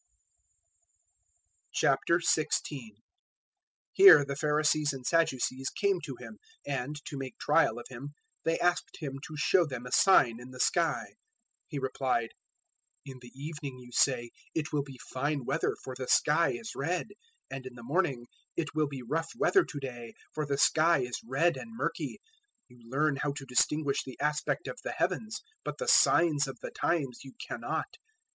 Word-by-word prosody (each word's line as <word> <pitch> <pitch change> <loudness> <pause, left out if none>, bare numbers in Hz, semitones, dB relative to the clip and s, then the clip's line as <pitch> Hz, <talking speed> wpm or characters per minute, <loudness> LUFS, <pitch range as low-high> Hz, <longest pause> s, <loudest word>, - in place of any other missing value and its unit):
016:001 150 -4 +1 1.0
Here 380 - +9
the 140 0 -4
Pharisees 150 0 +2
and 130 -2 -8
Sadducees 135 -5 +1
came 200 -3 0
to 145 -4 -6
Him; 115 -4 -11 0.3
and, 140 +1 -3
to 140 - -5
make 135 -1 -6
trial 160 -2 +3
of 120 - -7
Him, 135 +3 -9 0.3
they 165 0 +1
asked 175 0 0
Him 135 -3 -5
to 155 - -8
show 175 +5 +4
them 130 -6 -6
a 125 - -8
sign 130 -12 +5
in 125 +1 -10
the 130 0 -11
sky. - - +2
016:002 - - -18 0.5
He 150 - -5
replied, 130 -3 -1 0.8
"In 135 -2 -9
the 120 - -12
evening 145 -2 -6
you 125 -1 -13
say, 120 -2 +2 0.3
`It 155 -1 -2
will 145 - +2
be 135 -2 -10 0.2
fine 140 0 -1
weather, - - 0
for 130 - -6
the 130 -1 -5
sky 160 +3 +4
is 225 -1 -6
red;' 170 +6 -2 0.4
016:003 - - -3
and 130 - -10
in 125 - -10
the 120 - -11
morning, 140 -3 0 0.3
`It 160 -3 -1
will 155 -1 +1
be 135 -3 -7
rough 160 +6 -2
weather 385 -3 +4
to 145 - -7
day, 120 -4 -7 0.2
for 155 -1 -2
the 140 -1 0
sky 160 +2 +4
is 125 -1 -4
red 135 +9 +1
and 225 0 -9
murky.' - - -3 0.5
You 125 -1 -19
learn 140 +2 +1
how 145 0 -1
to 140 -1 -7
distinguish 140 +3 +1
the 130 - -10
aspect 150 +1 -1
of - - -6
the - - -3
heavens, 215 -1 -2 0.2
but - - -4
the 485 - -4
signs 150 -4 +5
of 135 - -7
the - - -7
times 140 -8 -1
you 135 - -11
cannot. - - -4
140 Hz, 170 wpm, -30 LUFS, 130-155 Hz, 1.0 s, Here